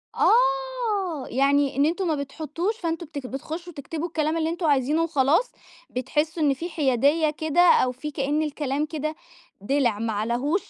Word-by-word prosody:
آه، 475 - +1
يعني 275 +2 +2
إن 280 +2 +3
أنتم 350 +4 0
ما 315 - +1
بتحُطُّوش، 315 +8 -3
فأنتُم 335 -3 -3
بت 285 -4 -7
بتخُشُّوا 320 +6 -6
تكتبوا 315 +4 -5
الكلام 315 -1 -1
اللي 320 0 0
أنتُم 340 +1 -3
عايزينه 290 +3 +2
وخلاص، 315 - +2 0.4
بتحِسُّوا 305 +5 -1
إن 280 -2 +4
في 335 +6 -5
حيادية 295 +1 +2
كده، 315 +2 +1
أو 330 -7 +5
في 280 +5 -6
كأن 285 +2 0
الكلام 290 -1 -2
كده 310 0 -4 0.5
دِلع 240 -1 +1
ما 225 0 -1
عليه 235 - 0
305 Hz, 155 wpm, -25 LUFS, 275-330 Hz, 0.5 s, أو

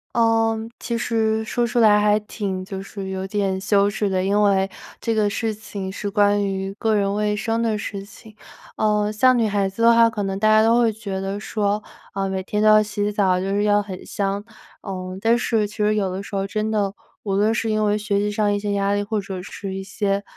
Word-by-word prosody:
呃， 225 -1 +3 0.2
其 235 -1 -3
实 220 -2 0
说 240 +2 -1
出 240 - -3
来 210 -2 +6
还 210 0 +3
挺 195 -3 -4
就 190 0 -6
是 195 0 -7
有 190 0 -4
点 195 -1 -1
羞 200 +1 +3
耻 205 0 -1
的， 185 -1 0
因 200 +2 +2
为 195 -2 +3 0.3
这 230 - -1
个 215 -2 +2
事 220 +2 -2
情 205 -2 -6
是 205 +1 -4
关 205 0 +3
于 195 0 -3
个 220 -1 +1
人 200 -1 +1
卫 210 0 0
生 225 +2 -1
的 225 -2 0
事 200 -1 -5
情。 215 +1 -15 0.4
呃， 210 -1 +1
像 255 +4 +4
女 230 -2 +2
孩 200 -2 0
子 215 +4 -4
的 235 0 +7
话， 230 0 +6
可 215 -2 -3
能 195 0 -3
大 215 - +2
家 215 0 +6
都 230 +2 +4
会 230 -2 +3
觉 205 -3 -5
得 195 +1 -3
说， 210 0 -1 0.3
呃， 195 0 -1
每 190 0 -2
天 210 +2 -3
都 - - +5
要 215 0 +7
洗 205 0 -2
澡， 190 -3 +2
就 190 +1 -2
是 205 +1 +1
要 205 0 +3
很 190 -3 -8
香， 200 0 -2 0.4
呃， 185 -2 -6
但 230 +2 +3
是 225 -3 0
其 210 - -13
实 210 0 +2
有 195 -3 0
的 190 +2 -4
时 200 - -7
候 195 0 -1
真 215 +2 -2
的 205 -2 0 0.3
无 200 - -2
论 210 +3 +3
是 225 0 -1
因 215 0 +1
为 205 0 +2
学 210 -1 -1
习 205 +1 0
上 205 0 +1
一 205 - +1
些 205 0 -3
压 200 0 +1
力， 205 - 0
或 210 0 -2
者 190 -2 -6
是 195 0 -6
一 195 - -5
些 200 0 -1
205 Hz, 255 characters per minute, -22 LUFS, 195-215 Hz, 0.4 s, 的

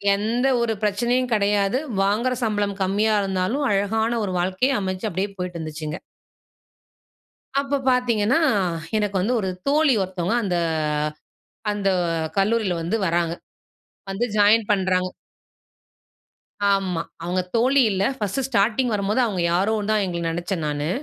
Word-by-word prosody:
எந்த 230 +6 0
ஒரு 225 -1 +1
பிரச்சனையும் 240 +4 +1
கெடையாது. 205 +3 +2 0.2
வாங்குற 225 +6 +1
சம்பளம் 205 -2 0
கம்மியா 210 +3 +2
இருந்தாலும், 195 +9 -1
அழகான 220 +4 +1
ஒரு 185 - -3
வாழ்க்கைய 190 +8 +1
அமைச்சு 185 +2 -3
அப்படியே 190 +4 -2
போயிட்டு 180 -2 -4
இருந்துச்சுங்க. 155 +1 -5 1.6
அப்ப 280 0 -1
பார்த்தீங்கன்னா, 245 -1 +2 0.6
எனக்கு 210 -2 0
வந்து 220 +7 0
ஒரு 190 - -2 0.2
தோழி 295 -2 +4
ஒருத்தவுங்க 185 +2 -2
அந்த 180 -3 0 1.2
அந்த 200 -1 0 0.5
கல்லூரில 205 -1 +2
வந்து 175 +7 -1
வராங்க. 170 0 0 0.8
வந்து 195 +5 -1
ஜாயின் 210 +1 +5
பண்றாங்க. 185 -2 +1 1.6
ஆமா, 185 -4 0 0.2
அவங்க 180 +2 -1 0.2
தோழி 265 +4 +4
இல்ல. 190 0 0
ஃபர்ஸ்ட்டு 220 +4 -2
ஸ்டார்ட்டிங் 235 +2 +2
வரும்போது 205 +4 0
அவங்க 195 -6 -1
யாரோ 195 +5 +2 0.2
தான் 215 -1 +2
எங்கள 170 -1 -3
நினைச்சேன் 175 -1 -3
நானு. 150 0 -2
205 Hz, 125 wpm, -23 LUFS, 185-230 Hz, 1.6 s, ஜாயின்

